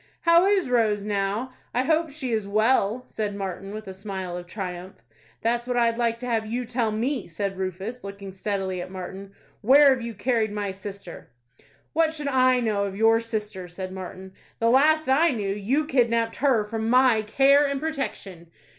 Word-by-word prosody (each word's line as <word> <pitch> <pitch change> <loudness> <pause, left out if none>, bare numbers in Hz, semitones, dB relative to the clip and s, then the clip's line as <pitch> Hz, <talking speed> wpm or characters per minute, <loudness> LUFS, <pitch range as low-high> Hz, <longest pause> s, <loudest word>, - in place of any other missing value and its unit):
"How 335 +2 +5
is 395 -5 +2
Rose 220 -4 +1
now? 210 +5 -2 0.2
I 250 - +2
hope 320 +3 +1
she 275 -4 -5
is 215 -3 -1
well," 215 +2 +2
said 210 -2 -4
Martin, 195 0 -5
with 215 0 -7
a 190 - -6
smile 190 -2 -5
of 175 0 -7
triumph. 185 -1 -6 0.5
"That's 235 +1 0
what 250 -1 -1
I'd 230 0 +2
like 230 -1 +1
to - - -4
have 230 -3 0
you 245 +3 -3
tell 230 -2 -1
me," 240 +3 -1
said 195 +3 -3
Rufus, 190 +6 -5
looking 200 0 -8
steadily 190 -2 -3
at 180 - -7
Martin. 190 +1 -8 0.3
"Where 275 +5 +7
have 255 - -4
you 230 -1 -6
carried 220 0 0
my 205 -1 -3
sister?" 195 -2 -9 0.6
"What 320 0 +2
should 295 -2 -3
I 255 -1 +4
know 210 -4 0
of 195 -1 -5
your 225 +2 +4
sister?" 210 -5 -4
said 185 +1 -7
Martin. 190 0 -8 0.2
"The 230 0 +2
last 310 +4 +4
I 280 +6 +4
knew, 205 -6 -1
you 245 +10 0
kidnapped 235 -5 +1
her 255 -6 +2
from 220 +1 -3
my 250 -2 +5
care 275 +6 +4
and 280 -1 -2
protection." 270 - -5
220 Hz, 185 wpm, -25 LUFS, 195-255 Hz, 0.6 s, Where